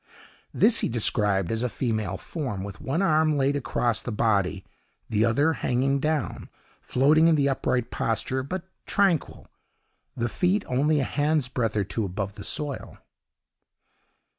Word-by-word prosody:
This 230 +1 +4
he - - 0
described 105 -5 +1
as 115 0 -1
a 125 - 0
female 110 -5 -2
form, 125 - -5
with 100 -1 -8
one 160 +8 -1
arm 155 -3 +3
laid 140 +1 +2
across 120 -4 0
the 120 - -5
body, 100 -4 0 0.4
the 110 0 +2
other 140 +8 +3
hanging 135 0 0
down, 155 +1 -2 0.3
floating 150 +5 +4
in 165 - +5
the 140 -2 +2
upright 125 -3 -1
posture, 115 +3 -1
but 170 +7 -5 0.2
tranquil, 195 -6 +1 0.7
the 120 - -1
feet 185 - 0
only 145 +4 +2
a - - +1
hand 145 0 0
breadth 115 -4 -1
or 105 - +2
two 110 +3 -3
above 100 +1 -4
the - - -9
soil. 145 -3 -4
130 Hz, 150 wpm, -26 LUFS, 110-150 Hz, 0.7 s, in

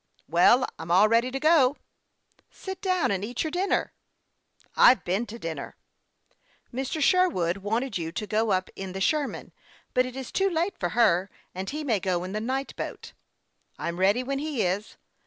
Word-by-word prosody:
" - - -37
Well, 180 - +5
I'm 165 0 -7
all 190 +5 +6
ready 230 +3 +2
to 270 +1 -4
go." 300 -3 +4 0.4
" - - -50 0.2
Sit 380 -1 -8
down 370 - +1
and 195 -1 -1
eat 235 +3 -3
your 315 - -3
dinner." 370 +4 0 0.4
" - - -50 0.3
I've 250 - +6
been 195 +7 -1
to 225 - -8
dinner." 160 -9 -6 0.5
" - - -39
Mr. 265 +5 -3
Sherwood 280 - +2
wanted 220 +2 -2
you 165 -1 -4
to 210 +5 -4
go 220 +2 0
up 185 0 0
in 190 -1 -6
the 190 - -4
Sher 290 +8 +1
man; - - -9 0.4
but 255 -1 +2
it 255 - -9
is 265 -2 -6
too 390 0 +1
late 345 +3 0
for 175 - -1
her, 190 -5 +3 0.2
and 190 +1 -5
he 305 +1 -4
may 230 -8 +1
go 180 -1 -1
in 185 - -6
the 215 +2 -3
night 265 +4 -3
boat." - - -7 0.3
" - - -44
I'm 170 +1 -4
ready 200 +7 +3
when 275 +1 -2
he 295 -5 -1
is. 190 +4 -2
230 Hz, 205 wpm, -26 LUFS, 190-275 Hz, 0.5 s, all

